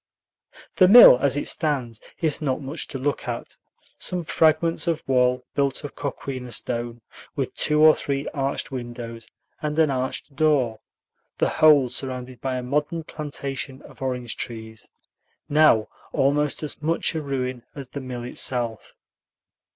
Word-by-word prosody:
The 185 - +7
mill, 205 - +10
as 140 0 +2
it - - -2
stands, 130 -8 -1 0.2
is 160 -3 0
not 135 -2 -1
much 145 +3 -6
to - - -5
look 140 +2 -2
at: - - -5 0.4
some 180 -1 -2
fragments 165 +1 +2
of 165 -2 0
wall 125 -1 +2
built 140 +1 0
of 145 - -6
coquina 130 -3 -5
stone, 120 0 -3 0.3
with - - -2
two 150 0 +1
or 155 0 +8
three 140 0 -3
arched 135 0 -3
windows 120 -2 -7 0.3
and 150 0 -3
an 155 -3 +4
arched 130 +2 -3
door, 135 -7 +2 0.6
the - - +2
whole 150 -4 +5
surrounded 125 -1 -5
by 130 -1 -2
a 125 - -3
modern 150 +5 -1
plantation 140 -3 -6
of - - -16
orange 125 -3 -3
trees, 110 -2 -7 0.6
now 150 -7 +4 0.3
almost 145 +2 +1
as 150 - -5
much 165 +2 0
a 160 - -2
ruin 130 -3 -3
as 135 -3 -8
the 140 - -6
mill 125 -2 -6
itself. 120 -2 -1
135 Hz, 150 wpm, -24 LUFS, 125-150 Hz, 0.6 s, mill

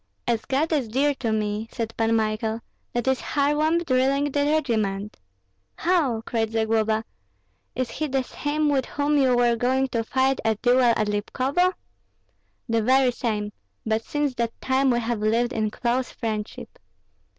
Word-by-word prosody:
"As 230 -2 0
God 285 +5 0
is 275 -6 +1
dear 275 +6 +1
to 230 -3 -1
me," 215 0 -1
said 225 -2 -4
Pan 225 0 +1
Michael, 220 +1 -1 0.3
"that 240 +1 -2
is 265 -1 +2
Kharlamp 305 +4 +1
drilling 275 +2 +2
the 285 +1 +1
regiment!" 215 -9 0 0.6
"How!" 310 -11 +1
cried 225 -2 -1
Zagloba; 220 0 +1 0.7
"is 255 -1 -2
he 310 - -2
the 270 -1 0
same 295 +4 -1
with 270 -3 +1
whom 290 +1 0
you 255 -3 +3
were 240 -1 +3
going 260 +3 +1
to 230 -2 -1
fight 265 +3 +1
a 220 0 +2
duel 245 +4 +3
at 230 -3 +3
Lipkovo?" 260 - 0 0.9
"The 230 -1 +1
very 260 +2 +4
same; 210 -3 -2 0.3
but 220 0 0
since 295 0 -1
that 235 -2 -3
time 265 +1 +2
we 240 -1 +2
have 235 -1 -2
lived 230 +4 +1
in 215 -1 0
close 245 +3 -1
friendship." 215 -3 -5
245 Hz, 160 wpm, -24 LUFS, 225-270 Hz, 0.9 s, very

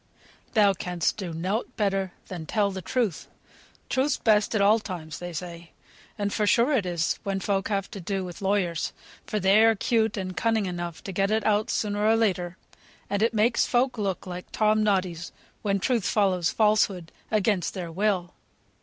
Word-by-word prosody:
] - - -30
"Thou 205 -2 +5
canst 180 -2 -1
do 185 -5 -4
nought 190 +10 -3
better 195 -3 0 0.2
than 170 -4 -7
tell 205 -2 +1
the 190 -1 -5
truth. 220 -3 -1 0.6
Truth's 270 +3 +1
best 215 0 +2
at - - +2
all 205 +3 +5
times, 170 -7 -7
they 175 0 -6
say; 170 0 -7 0.4
and 205 -1 -1
for 210 - +1
sure 240 +7 +4
it 215 -9 +1
is 170 -2 -1
when 195 -1 -2
folk 195 0 -1
have 200 -2 -2
to 200 -4 -7
do 190 +1 -2
with 175 +1 -9
lawyers; 190 -4 0 0.3
for 215 - -1
they're 215 +4 +5
'cute 220 0 +1
and 185 -2 -4
cunning 225 -1 +1
enough 175 -2 -5
to 195 - -5
get 195 +2 +1
it 220 +1 0
out 210 0 +2
sooner 205 -1 -1
or 220 +1 +4
later, 185 -5 0 0.5
and 200 0 0
it 225 0 +2
makes 230 +3 +3
folk 250 +1 +2
look 195 -3 -2
like 180 -1 -7
Tom 215 0 +2
Noddies, 185 -5 0 0.3
when 200 -1 +1
truth 225 -1 0
follows 185 -5 +2
falsehood, 210 -5 +2 0.2
against 210 -3 +1
their 175 -3 -5
will." 185 -1 0
200 Hz, 180 wpm, -26 LUFS, 180-215 Hz, 0.6 s, Thou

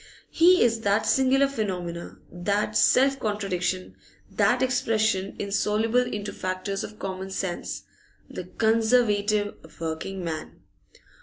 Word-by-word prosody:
He 360 +2 +5
is 230 -1 +2
that 205 +1 +1
singular 270 +1 +3
phenomenon, 180 -9 -4
that 200 +4 -1
self 270 +1 +4
contradiction, 185 - -2 0.4
that 215 +5 +2
expression 220 -6 +1
insoluble 210 +4 +1
into 210 -4 -4
factors 185 +1 -3
of 210 - -8
common 190 -1 -5
sense 190 -2 -4 0.4
the 180 - -7
Conservative 215 -1 +2 0.3
working 165 +4 -4
man. 160 -2 -6
205 Hz, 105 wpm, -26 LUFS, 185-230 Hz, 0.4 s, He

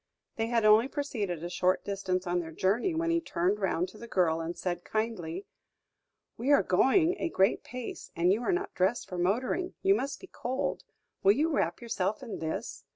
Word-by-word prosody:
They 225 0 -1
had 230 -2 +1
only 215 +3 +6
proceeded 210 - -3
a 175 - -3
short 185 +1 +1
distance 190 -2 -2
on 175 0 0
their 165 -2 -5
journey, 215 - +1
when 335 +1 +1
he 335 0 +2
turned 195 - 0
round 185 -2 0
to 215 - -14
the 235 - -8
girl, 165 -6 +2
and 165 +1 -4
said 175 -1 -3
kindly: 205 -5 -3 0.9
"We 260 +5 0
are 285 - +6
going 320 - +3
a 335 - 0
great 195 -7 +2
pace, 250 -1 -7
and 175 +3 +3
you 220 - -1
are 310 - 0
not 380 +3 -1
dressed 190 +6 +1
for 180 - -5
motoring; 250 - 0
you 390 0 +6
must 280 -8 -2
be - - -10
cold. 260 -7 -3 0.4
Will 195 - +6
you 305 +8 +1
wrap 170 - 0
yourself 215 0 -1
in 235 - -6
this?" 160 0 -4
210 Hz, 200 wpm, -30 LUFS, 180-265 Hz, 0.9 s, only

